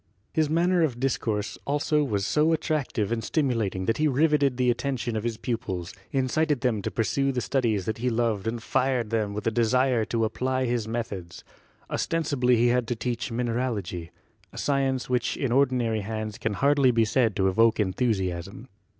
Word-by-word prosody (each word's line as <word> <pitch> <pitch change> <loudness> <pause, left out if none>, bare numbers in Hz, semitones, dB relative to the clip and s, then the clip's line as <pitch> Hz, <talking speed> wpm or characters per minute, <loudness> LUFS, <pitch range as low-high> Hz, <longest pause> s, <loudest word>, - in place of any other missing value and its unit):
His 155 -2 +2
manner 175 +3 +2
of 135 -7 0
discourse 110 -5 -1
also 150 +1 +1
was 100 -8 -1
so 155 +2 +2
attractive 145 -10 -1
and 115 -1 -1
stimulating 115 - 0
that 115 - +1
he 155 - +2
riveted 145 -2 +2
the 125 -1 +3
attention 120 -2 -2
of 110 - -2
his 115 -2 -2
pupils, 100 -8 -4 0.2
in 135 -1 +1
cited 150 -1 +1
them 115 -5 +1
to - - -2
pursue 135 +4 0
the 125 - -1
studies 115 -7 0
that 110 +2 -3
he 125 +2 0
loved 115 -3 0
and 115 0 -3
fired 130 -4 0
them 105 -3 -1
with 105 - -4
a 115 - +2
desire 120 +1 +2
to 115 0 0
apply 130 +3 -1
his 120 -3 -1
methods. 100 -7 -5 0.5
Ostensibly 140 -7 +1
he 120 +1 +3
had 125 -1 +1
to 120 - -1
teach 120 +1 -3
mineralogy 115 -8 -2 0.2
— - - -35
a - - -13
science 135 -2 0
which 125 -1 0
in 135 -4 -1
ordinary 125 -4 +2
hands 110 +1 -5
can 110 - -1
hardly 140 +3 +3
be 115 -2 +3
said 110 -1 +1
to 95 - +2
evoke 115 +4 +3
enthusiasm. 95 0 -1
120 Hz, 185 wpm, -26 LUFS, 110-135 Hz, 0.5 s, the